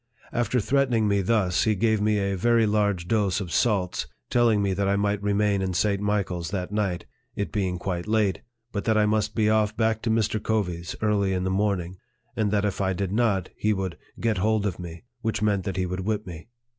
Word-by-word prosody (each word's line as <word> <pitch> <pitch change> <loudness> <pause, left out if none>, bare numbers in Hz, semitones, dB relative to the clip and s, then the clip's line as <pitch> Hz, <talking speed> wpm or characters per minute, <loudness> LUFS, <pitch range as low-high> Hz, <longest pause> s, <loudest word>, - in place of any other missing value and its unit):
After 120 0 +1
threatening 125 -2 +2
me 100 -1 +2
thus, 95 -3 +1
he 110 -1 +2
gave 110 +1 +1
me 105 0 +2
a 100 -1 0
very 115 +4 +3
large 100 -4 +1
dose 100 -3 +1
of 90 -4 -5
salts, 100 -5 +1 0.2
telling 120 -3 +4
me 100 -1 +1
that 100 +1 0
I 100 - +2
might 100 0 0
remain 100 -1 +1
in 95 -1 -2
St. 100 +1 +1
Michael's 95 -5 -1
that 95 -1 -3
night, 100 -5 -1 0.3
(it 100 - -3
being 95 -4 -1
quite 90 0 -3
late,) 105 -3 +1 0.3
but 100 - -3
that 110 -1 +3
I 105 - +4
must 105 0 0
be 110 -2 +2
off 110 0 +2
back 110 -1 +1
to 115 - -2
Mr. 110 -1 +1
Covey's 90 -6 -2
early 100 -3 +2
in 90 -1 -1
the 95 - -1
morning; 95 -3 -1 0.4
and 110 -2 +1
that 105 0 +1
if 100 -1 -2
I 95 -1 +1
did 95 0 -2
not, 105 -4 +1
he 105 0 +1
would 95 -3 -3 0.2
get 110 -4 0
hold 110 +1 +1
of 95 -4 -2
me, 85 0 -8 0.2
which 110 -2 -1
meant 100 -3 +1
that 95 -2 -3
he 95 - +1
would 90 +1 -4
whip 105 +2 -2
me. 85 +1 -9
100 Hz, 220 wpm, -25 LUFS, 95-110 Hz, 0.4 s, telling